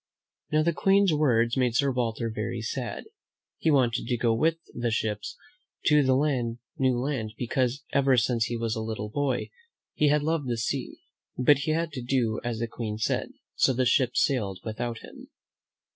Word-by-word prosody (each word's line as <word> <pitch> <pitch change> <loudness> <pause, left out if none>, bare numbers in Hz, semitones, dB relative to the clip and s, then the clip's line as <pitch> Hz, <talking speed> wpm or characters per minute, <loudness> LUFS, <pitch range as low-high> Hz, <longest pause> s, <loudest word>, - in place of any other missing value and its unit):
Now, 155 0 +3
the 170 +1 +2
Queen's 195 0 +3
words 120 -6 +2
made 125 -3 +1
Sir 140 +1 +3
Walter 115 -2 -1
very 115 +2 -3
sad. 120 +2 -4 0.6
He 160 - +1
wanted 125 -6 +2
to 120 - 0
go 115 0 +2
with 160 +8 +2 0.2
the 120 0 -1
ships 110 -2 -2 0.5
to 150 -2 +5
the 130 -3 +1 0.2
new 130 -2 +2
land, 120 -4 -2
because 125 +2 -1
ever 135 -2 +4
since 115 -1 +2
he 120 - -3
was 115 -1 -1
a 110 - -3
little 110 -1 -4
boy 135 0 -1 0.4
he 150 - +2
had 150 0 +2
loved 160 -3 0
the 120 -1 -1
sea; 115 - -3 0.4
but 135 +2 +5
he 140 +3 -1
had 165 0 -1
to 135 -3 -5
do 120 -3 0
as 120 -2 -2
the 115 +1 -2
Queen 110 -2 -5
said, 110 - -1 0.2
so 130 - +3
the 130 +1 +1
ships 125 0 +3
sailed 105 -9 -2
without 115 +1 -4
him. - - -12
125 Hz, 180 wpm, -27 LUFS, 115-140 Hz, 0.6 s, to